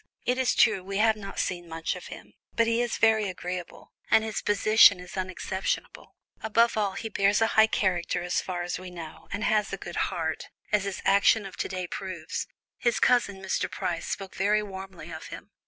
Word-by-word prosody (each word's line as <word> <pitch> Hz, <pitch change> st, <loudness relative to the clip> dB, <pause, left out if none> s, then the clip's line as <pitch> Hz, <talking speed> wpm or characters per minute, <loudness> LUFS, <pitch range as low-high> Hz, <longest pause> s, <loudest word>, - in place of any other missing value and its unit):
It 250 Hz, +1 st, +1 dB
is 255 Hz, -1 st, +2 dB
true, 210 Hz, -5 st, +4 dB
we 195 Hz, +1 st, -4 dB
have 220 Hz, +1 st, +4 dB
not 200 Hz, -2 st, -9 dB
seen 175 Hz, -2 st, -2 dB
much 165 Hz, 0 st, -3 dB
of -, -, -9 dB
him, -, -, -11 dB, 0.2 s
but 230 Hz, -, +4 dB
he 230 Hz, +1 st, +1 dB
is 240 Hz, -1 st, -1 dB
very 220 Hz, -2 st, +3 dB
agreeable, 180 Hz, -1 st, -7 dB, 0.2 s
and 220 Hz, -, +5 dB
his 220 Hz, -1 st, -3 dB
position 210 Hz, -1 st, +6 dB
is 180 Hz, 0 st, -10 dB
unexceptionable. 190 Hz, 0 st, -4 dB, 0.3 s
Above 230 Hz, +2 st, +3 dB
all, 205 Hz, -3 st, 0 dB
he 225 Hz, -, -5 dB
bears 200 Hz, -1 st, +2 dB
a 225 Hz, -, +4 dB
high 220 Hz, 0 st, +6 dB
character 180 Hz, -4 st, 0 dB
as 180 Hz, -, 0 dB
far 180 Hz, -2 st, -4 dB
as 175 Hz, 0 st, -3 dB
we 185 Hz, 0 st, -8 dB
know, 170 Hz, -3 st, -10 dB
and 205 Hz, +3 st, -3 dB
has 210 Hz, -1 st, +2 dB
a -, -, -3 dB
good -, -, -7 dB
heart, -, -, -3 dB, 0.2 s
as 210 Hz, -2 st, +2 dB
his 200 Hz, -1 st, -4 dB
action 200 Hz, +2 st, +4 dB
of 195 Hz, -, -8 dB
to -, -, -2 dB
day 185 Hz, -1 st, -4 dB
proves. 175 Hz, -2 st, -5 dB, 0.3 s
His 240 Hz, -1 st, +1 dB
cousin, 205 Hz, -6 st, +2 dB
Mr. 190 Hz, -, -1 dB
Price, -, -, -3 dB
spoke 195 Hz, -1 st, -5 dB
very 210 Hz, +2 st, +2 dB
warmly 190 Hz, -4 st, -9 dB
of 160 Hz, 0 st, -7 dB
him. -, -, -10 dB
195 Hz, 205 wpm, -27 LUFS, 185-220 Hz, 0.3 s, position